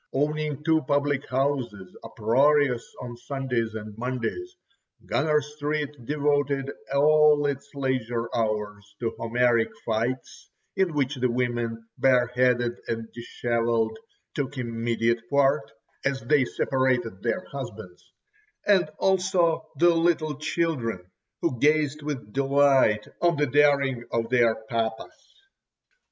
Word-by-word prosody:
Owning 150 +1 -1
two 160 0 +3
public 145 0 0
houses, 125 -8 -2
uproarious 130 +2 +2 0.2
on 120 -1 -7
Sundays 125 -4 -3
and 105 -1 -7
Mondays, 130 - -3 0.5
Gunner 150 0 +2
Street 150 0 -3
devoted 145 -2 0 0.2
all 150 +1 +5
its 140 -1 -3
leisure 125 -4 -1
hours 105 -2 -2
to 115 -2 -1
Homeric 120 0 +2 0.2
fights, 115 +3 -3 0.3
in 185 -5 +1
which 140 -1 0
the 125 0 +1
women, 120 -2 -2
bare 125 -2 +4
headed 125 -1 +1
and 115 -1 -4
dishevelled, 115 -1 -1 0.4
took 140 -1 -3
immediate 115 -1 0
part 140 -4 +2 0.3
(as 135 -1 0
they 130 +3 +3
separated 125 -7 0
their 120 +10 -1
husbands), 110 -10 -8 0.5
and 190 -6 +4
also 185 -3 +1
the 175 +1 +5
little 165 -2 +1
children, 125 - -2 0.3
who 125 - 0
gazed 150 0 +2
with 145 -8 -5
delight 135 -5 +3
on 170 -2 +3
the 145 - +2
daring 140 -2 +3
of 115 -1 -1
their 120 -3 +3
papas. 115 - -4
130 Hz, 115 wpm, -26 LUFS, 115-145 Hz, 0.5 s, all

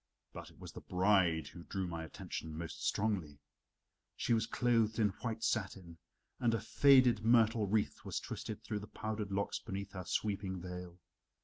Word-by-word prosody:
But - - -8
it - - -20
was - - -9
the - - -9
bride 90 -5 +2
who 85 - -11
drew 95 +2 -3
my 85 -2 -4
attention 80 0 -6
most 80 -2 -6
strongly. 95 -9 0 0.8
She - - +1
was 115 0 +2
clothed 115 -3 +2
in 110 -3 +4
white 115 -2 -3
satin, 95 -6 -2 0.4
and 120 -3 +2
a - - -1
faded 125 0 +5
myrtle 115 -2 +4
wreath 105 +1 0
was - - -3
twisted 110 0 -6
through 110 -2 -3
the 105 - -9
powdered 110 -2 -4
locks 100 +1 -1
beneath 100 +1 -5
her 95 -2 -6
sweeping 100 -1 -1
veil. 90 0 -7
100 Hz, 170 wpm, -35 LUFS, 90-110 Hz, 0.8 s, faded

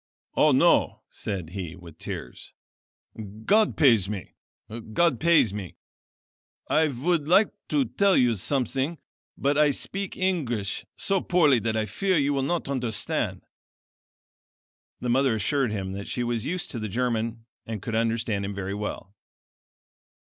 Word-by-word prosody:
"Oh, - - +5
no," - - +3
said 95 -6 -5
he 90 -3 -5
with 85 -3 -14
tears, - - -7 0.9
"God 215 +1 +3
pays 115 - +4
me! 100 -5 -6 0.6
God 165 -3 +3
pays 165 - +4
me! 100 -5 -6 0.9
I 155 +1 +3
would 150 +3 0
like 195 +5 +5 0.2
to 285 -3 +1
tell 200 -4 +2
you 125 -2 +4
something, 135 - -1 0.4
but 140 +2 +1
I 150 -1 +5
speak 195 +7 -3
English 130 - -1
so 195 -2 0
poorly 155 -8 +4
that 110 -1 -1
I 110 - 0
fear 185 - 0
you 145 -1 +2
will 135 - 0
not 165 +4 -1
understand." 125 -5 -1 1.6
The 125 - -2
mother 130 -1 +3
assured 125 +3 +1
him 95 -3 -3
that 100 +1 -6
she 125 - -2
was 120 -2 -2
used 180 +1 -3
to 120 - -4
the 110 -1 -4
German 115 0 -2 0.2
and 110 -2 -4
could 115 - -5
understand 115 -2 0
him 100 0 -4
very 100 0 -4
well. 105 -1 -5
120 Hz, 145 wpm, -26 LUFS, 105-150 Hz, 1.6 s, Oh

